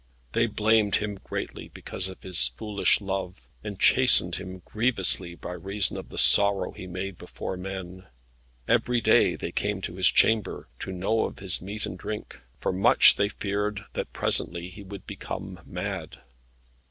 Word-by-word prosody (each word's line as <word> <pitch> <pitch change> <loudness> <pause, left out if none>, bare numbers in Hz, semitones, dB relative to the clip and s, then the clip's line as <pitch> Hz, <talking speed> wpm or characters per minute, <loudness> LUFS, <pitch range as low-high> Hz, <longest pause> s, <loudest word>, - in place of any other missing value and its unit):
They 115 +7 +2
blamed 110 -1 +2
him 105 -2 -2
greatly - - -6
because 95 0 -4
of 95 - -12
his 85 -9 +4
foolish 100 - +1
love, 95 -2 -5 0.2
and 105 -2 -7
chastened 125 -9 +5
him 95 -1 -9
grievously 95 -6 +1
by 85 - -8
reason 95 +3 -1
of - - -7
the - - -10
sorrow 100 -2 +5
he 95 - -10
made 90 +1 -6
before 95 - -6
men. 95 0 -7 0.6
Every 125 -1 +2
day 115 - +4
they - - -5
came 105 -1 -2
to 90 - -6
his 95 - +4
chamber, 110 -2 +2
to - - -5
know 95 +5 0
of - - -7
his 95 -3 0
meat 100 +3 -4
and 90 - -7
drink, 105 0 -6 0.2
for - - -1
much 95 +2 +6
they 100 0 +1
feared 105 0 -3
that - - -4
presently 85 0 -1
he 95 +3 -12
would 100 -1 -10
become - - -7
mad. - - -5
95 Hz, 165 wpm, -26 LUFS, 90-105 Hz, 0.6 s, much